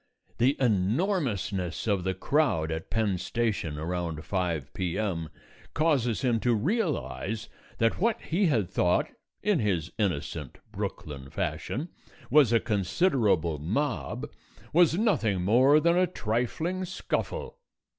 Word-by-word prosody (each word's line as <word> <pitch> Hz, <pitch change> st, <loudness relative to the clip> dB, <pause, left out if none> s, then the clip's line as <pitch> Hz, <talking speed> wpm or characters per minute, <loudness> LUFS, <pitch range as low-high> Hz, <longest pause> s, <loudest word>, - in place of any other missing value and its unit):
The 130 Hz, +4 st, +3 dB
enormousness 105 Hz, -, 0 dB
of 100 Hz, -5 st, +1 dB
the 95 Hz, 0 st, -1 dB
crowd 95 Hz, -, +1 dB
at 80 Hz, 0 st, -4 dB
Penn 105 Hz, -5 st, 0 dB
Station 100 Hz, -9 st, -1 dB
around 85 Hz, -1 st, -3 dB
5 85 Hz, -7 st, -2 dB
P.M. 90 Hz, -3 st, -2 dB, 0.5 s
causes 130 Hz, -, +2 dB
him 120 Hz, -3 st, +2 dB
to 120 Hz, +1 st, +2 dB
realize 110 Hz, -, -1 dB, 0.3 s
that 115 Hz, 0 st, +1 dB
what 230 Hz, +2 st, +2 dB
he 185 Hz, +4 st, +1 dB
had 115 Hz, -, +2 dB
thought, 90 Hz, -1 st, +1 dB, 0.3 s
in 210 Hz, -6 st, +2 dB
his 90 Hz, -7 st, 0 dB
innocent 80 Hz, -, -2 dB
Brooklyn 70 Hz, -3 st, -5 dB
fashion, 150 Hz, -, -3 dB, 0.4 s
was 145 Hz, -6 st, +6 dB
a 115 Hz, -, +5 dB
considerable 100 Hz, -, +1 dB
mob, 125 Hz, -, -2 dB, 0.5 s
was 170 Hz, 0 st, +5 dB
nothing 110 Hz, -, +1 dB
more 130 Hz, +9 st, +5 dB
than 170 Hz, +2 st, +3 dB
a 180 Hz, 0 st, +4 dB
trifling 155 Hz, +7 st, -2 dB
scuffle. 475 Hz, -, -3 dB
110 Hz, 120 wpm, -28 LUFS, 90-150 Hz, 0.5 s, was